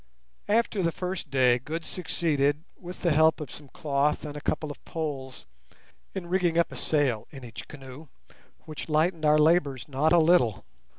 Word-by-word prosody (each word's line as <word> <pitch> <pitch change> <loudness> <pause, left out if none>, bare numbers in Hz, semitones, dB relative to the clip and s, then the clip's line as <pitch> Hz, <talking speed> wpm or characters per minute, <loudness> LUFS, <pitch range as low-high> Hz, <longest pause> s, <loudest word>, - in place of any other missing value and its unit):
After 215 -1 +1
the 170 -2 +1
first 180 -2 -4
day 125 -2 +4
Good 160 +6 -5
succeeded, 150 -4 0
with 180 0 -10
the 170 - +3
help 160 +1 +4
of 150 - -7
some 150 - -11
cloth 145 +2 0
and 150 -1 -6
a 150 - -6
couple 155 +1 -2
of - - -12
poles, 140 -5 -5 0.7
in 190 -2 -4
rigging 175 -2 +1
up 170 - +2
a - - -8
sail 135 -8 0
in 135 -3 -11
each 115 -3 -9
canoe, 135 +2 -11 0.6
which 155 +1 -7
lightened 155 +1 +1
our 150 0 +5
labours 150 -4 +2
not 145 +3 +1
a 175 - +6
little. 155 - +3
155 Hz, 175 wpm, -27 LUFS, 140-170 Hz, 0.7 s, a